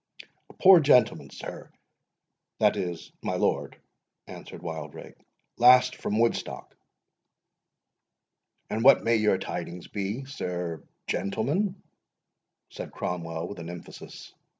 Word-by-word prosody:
"A - - -14
poor 190 -2 +7
gentleman, 125 -7 +3
sir,—that - - -5
is, 90 -2 -4
my - - -2
lord,"—answered - - -5
Wildrake; - - -7 0.5
"last 125 +1 +7
from 105 - -2
Woodstock." 115 +1 -1 2.0
"And 110 - -1
what 135 +2 +7
may 115 0 +3
your 105 -3 +3
tidings 90 -2 -6
be, 105 +6 -4
sir 90 - -4 0.2
gentleman?" 155 - -1 0.9
said - - -7
Cromwell, 85 -1 -4
with 100 - -8
an 85 0 -7
emphasis. 85 0 -10
110 Hz, 100 wpm, -27 LUFS, 90-130 Hz, 2.0 s, poor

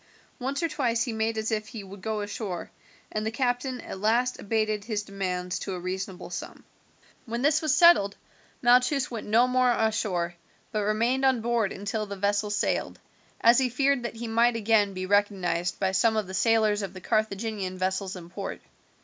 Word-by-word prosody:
Once 275 +5 -2
or - - +3
twice 240 -7 0
he 240 - -3
made 220 0 -1
as 220 +1 -1
if 215 -1 -1
he 220 -3 -8
would 195 0 -11
go 220 +1 -2
ashore, 205 -4 -5 0.4
and 215 - -2
the 220 - 0
captain 250 +2 -1
at 190 - -7
last 235 +5 +1
abated 215 -1 0
his 210 -2 -2
demands 185 -3 -3
to 195 - -4
a - - -5
reasonable 185 +1 -5
sum. - - -7 0.6
When 235 +2 -3
this 305 +3 +3
was 310 -2 +2
settled 315 - +6 0.5
Malchus 250 +3 +4
went 230 -3 -5
no 230 +4 +4
more 255 0 +3
ashore, 210 -7 0 0.4
but 215 - -1
remained 230 +6 +1
on 260 -3 +3
board 230 -3 +1
until 205 +2 -3
the 200 - -5
vessel 205 +2 0
sailed, 205 0 -1 0.4
as 235 +2 +6
he 260 -1 +2
feared 275 +2 +2
that 235 -1 -5
he 235 +1 -5
might 230 +1 +3
again 210 -3 +2
be 185 0 -3
recognized 185 -3 +1
by 190 -1 +1
some 220 +3 +2
of 215 - 0
the 190 - -9
sailors 215 +1 +3
of 195 -1 -6
the 185 - -8
Carthaginian 215 -2 -1
vessels 190 +1 -1
in 175 -1 -10
port. 195 +1 -5
215 Hz, 190 wpm, -27 LUFS, 195-240 Hz, 0.6 s, settled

